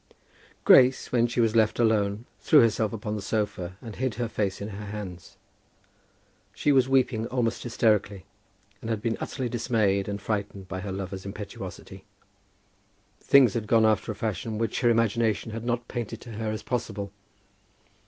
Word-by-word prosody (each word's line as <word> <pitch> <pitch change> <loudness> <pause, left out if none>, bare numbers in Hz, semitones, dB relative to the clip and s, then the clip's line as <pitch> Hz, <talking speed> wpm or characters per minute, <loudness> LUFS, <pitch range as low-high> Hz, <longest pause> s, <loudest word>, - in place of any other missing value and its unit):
Grace, 130 0 +6
when 120 -1 +3
she 120 +1 -3
was 115 -1 +2
left 110 -2 +3
alone, 110 -1 +1
threw 150 - +5
herself 110 -2 +2
upon 105 -1 -4
the 105 - -4
sofa, 95 -3 -3
and 110 -4 -8
hid 130 -3 -1
her 120 +1 -2
face 100 -3 -2
in 100 - -5
her 105 0 -7
hands. 100 -4 -8 1.2
She 145 - +2
was 130 -2 +4
weeping 125 -4 +2
almost 120 -3 -1
hysterically, 105 -5 0 0.6
and 115 - -6
had 110 -2 -1
been 115 -1 0
utterly 130 -3 -3
dismayed 110 -5 0
and 100 0 -3
frightened 100 -2 -4
by 95 - -5
her 95 +1 -5
lover's 95 0 -5
impetuosity. 100 +1 -8 1.2
Things 135 -6 +5
had 110 -2 -3
gone 110 0 +4
after 110 +1 +2
a - - -6
fashion 110 +1 -3
which 115 +1 -1
her 120 - +4
imagination 115 -1 +1
had 115 +1 -6
not 120 0 -1
painted 115 -2 -5
to 120 - -10
her 110 0 -3
as 110 -1 -4
possible. 105 -5 -3
110 Hz, 165 wpm, -26 LUFS, 100-120 Hz, 1.2 s, Grace